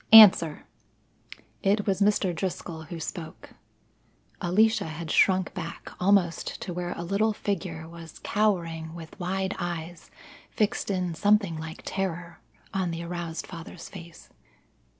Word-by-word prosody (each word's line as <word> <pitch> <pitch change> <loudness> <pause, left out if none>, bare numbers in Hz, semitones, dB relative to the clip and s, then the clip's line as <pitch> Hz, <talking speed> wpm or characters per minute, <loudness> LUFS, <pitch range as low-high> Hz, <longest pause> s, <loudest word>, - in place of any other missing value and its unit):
"Answer!" 190 -8 +9 1.0
It 205 +1 +2
was 195 -1 0
Mr. 200 -3 +3
Driscoll 165 -2 -4
who 170 0 -7
spoke. 160 0 -7 0.9
Alicia 220 +6 +3
had 160 0 -5
shrunk 185 -2 +4
back, 170 -2 -6
almost 180 -3 +2
to 180 - -4
where 175 0 -3
a 170 - -5
little 200 +5 +1
figure 175 -6 -3
was 165 -1 -11
cowering 165 -6 0
with 165 +2 -10
wide 190 +2 -1
eyes 175 -1 -5 0.4
fixed 215 0 0
in 180 -3 0
something 205 -1 +3
like 160 +1 -7
terror 175 -3 -3 0.3
on 190 -2 0
the 165 0 -4
aroused 170 -1 -4
father's 170 -1 -9
face. 170 -4 -11
175 Hz, 130 wpm, -27 LUFS, 165-195 Hz, 1.0 s, Answer